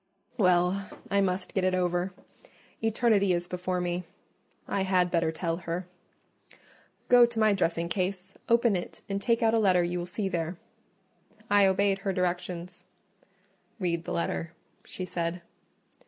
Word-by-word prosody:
"Well, 180 -2 +2 0.2
I 200 0 +3
must 185 -1 -1
get 190 - 0
it 185 0 +2
over. 180 +1 0 0.7
Eternity 220 -4 +3
is 175 0 -1
before 180 0 -2
me: 175 0 -2 0.6
I 195 - -1
had 185 -2 +2
better 165 -2 +2
tell 165 0 -2
her.—Go 180 +7 -2
to 235 -1 -4
my 215 -1 +4
dressing 170 -3 0
case, 185 +1 -2
open 235 -2 +4
it, 175 - -5
and 200 0 -2
take 230 +2 +1
out 225 0 +4
a 225 - +4
letter 185 -4 +4
you 175 +1 -2
will 175 - -4
see 195 +2 -3
there." 170 -1 -2 0.9
I 205 -1 +6
obeyed 195 +1 +2
her 195 -1 -2
directions. 180 0 -3 0.9
"Read 170 -3 -1
the - - -5
letter," 170 0 -2 0.3
she 185 - -6
said. 170 0 -3
185 Hz, 145 wpm, -28 LUFS, 175-200 Hz, 0.9 s, I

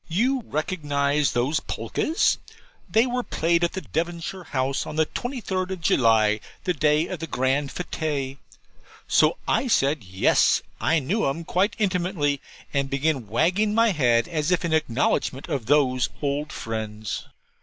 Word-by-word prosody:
'You 245 +10 +1
recognize 145 -3 0
those 130 +6 +1
polkas? 320 - 0 0.5
They 225 +2 +4
were 250 0 -1
played 170 -6 +1
at 185 +2 -2
Devonshire 170 +3 -3
House 135 -1 -1
on - - -6
the 160 0 +3
23rd 195 - -3
of 190 -2 -5
July, 110 -7 +3 0.2
the 180 - +1
day 150 0 +2
of 185 - -5
the 165 - -5
grand 135 +1 0
fête.' 145 -6 -3 0.7
So - - +4
I 265 - +1
said 140 - +2
yes 95 0 +3 0.2
I 165 - +2
knew 165 +9 0
'em 165 +5 -4
quite 195 +5 +1
intimately; 180 -8 0 0.3
and 140 -1 0
began 140 -3 0
wagging 185 - +1
my 230 -1 +4
head 120 -8 +2
as 155 -3 -1
if 180 -1 +1
in 165 - -1
acknowledgment 135 -2 0
of 135 -8 -2
those 130 -3 +3
old 145 +1 -2
friends. 110 -3 -5
155 Hz, 145 wpm, -24 LUFS, 135-180 Hz, 0.7 s, They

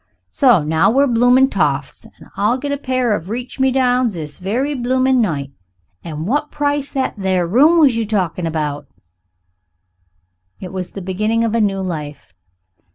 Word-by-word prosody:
So 245 - +4
now 160 +5 +2
we're 270 +5 +3
bloomin' 245 +2 +3
toffs, - - -1
an' - - -18
I'll 215 +5 +1
get 285 +2 -4
a 285 - -1
pair 255 -4 0
of 180 -1 -7
reach 245 +4 -6
me 265 0 +3
downs 250 -4 +1
this 150 -3 -7
very 240 +10 -1
bloomin' 255 0 +1
night. 145 -9 -2 0.5
And 155 -1 -6
what 290 +8 -1
price 290 -1 -2
that 265 -1 -1
there 185 -2 0
room 295 - +5
you 235 -3 0
was 225 - -2
talkin' 180 -5 -1
about?" 150 -3 -3 1.7
It 185 -1 -8
was 185 -2 -5
the 195 - -7
beginning 215 +5 -1
of 225 -1 -1
a 230 - +2
new 195 -2 0
life. 150 - -6
225 Hz, 165 wpm, -18 LUFS, 180-260 Hz, 1.7 s, room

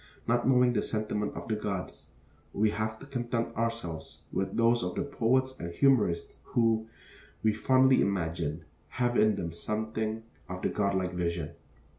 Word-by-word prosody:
Not 120 +1 +2
knowing 125 -1 +5
the - - +2
sentiments 105 -1 -2
of - - -6
the 110 - 0
gods, 100 -3 -4 0.5
we 105 +1 +2
have 110 +1 -2
to 135 - -11
content 120 -4 -2
ourselves 115 -9 -3
with 95 - -1
those 115 +1 +4
of 90 0 -3
the - - 0
poets 130 -1 +1
and 85 0 -4
humorists 105 -7 +2
who, 115 -1 +1 0.6
we 110 -1 +4
fondly 130 +4 +4
imagine, 80 -4 -1 0.3
have 120 -1 +1
in 110 -1 +4
them 85 -1 -4
something 110 +3 -2 0.3
of 90 0 -6
the - - +2
god 100 -1 0
like 90 -1 -1
vision. 85 -3 -2
110 Hz, 160 wpm, -30 LUFS, 90-120 Hz, 0.6 s, knowing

